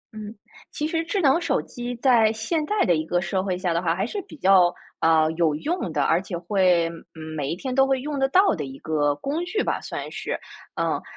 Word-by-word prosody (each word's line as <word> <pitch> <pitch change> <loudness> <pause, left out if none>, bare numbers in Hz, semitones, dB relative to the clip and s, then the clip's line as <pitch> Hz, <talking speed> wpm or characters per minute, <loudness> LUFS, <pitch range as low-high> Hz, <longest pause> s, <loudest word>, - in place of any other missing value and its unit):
嗯， 215 0 -8 0.4
其 300 - -3
实 325 +1 -1
智 340 +5 -2
能 290 +2 +4
手 - - +1
机 245 0 -6
在 235 -3 +4
现 225 +9 -2
代 420 0 +1
的 175 - +3
一 155 - -1
个 175 +2 0
社 185 +1 -1
会 185 -2 -2
下 180 -2 -1
的 170 - 0
话 170 -2 +1
还 190 +3 -1
是 400 - -4
比 - - -12
较， 185 -6 +5 0.3
呃， 160 -1 +3
有 160 -2 +1
用 315 - -2
的， 150 -2 0
而 165 +5 +2
且 190 -2 -5
会 180 -1 +2 0.5
每 140 -3 -2
一 - - -1
天 255 +8 -4
都 270 +1 +4
会 270 -1 +1
用 290 0 -3
得 270 - +2
到 375 - +4
的 160 - -3
一 135 -1 -8
个 145 -2 +1
工 285 - -3
具 420 +4 -1
吧， - - -1
算 - - -6
是。 - - -4 0.4
嗯， - - -1
195 Hz, 245 characters per minute, -24 LUFS, 165-275 Hz, 0.5 s, 较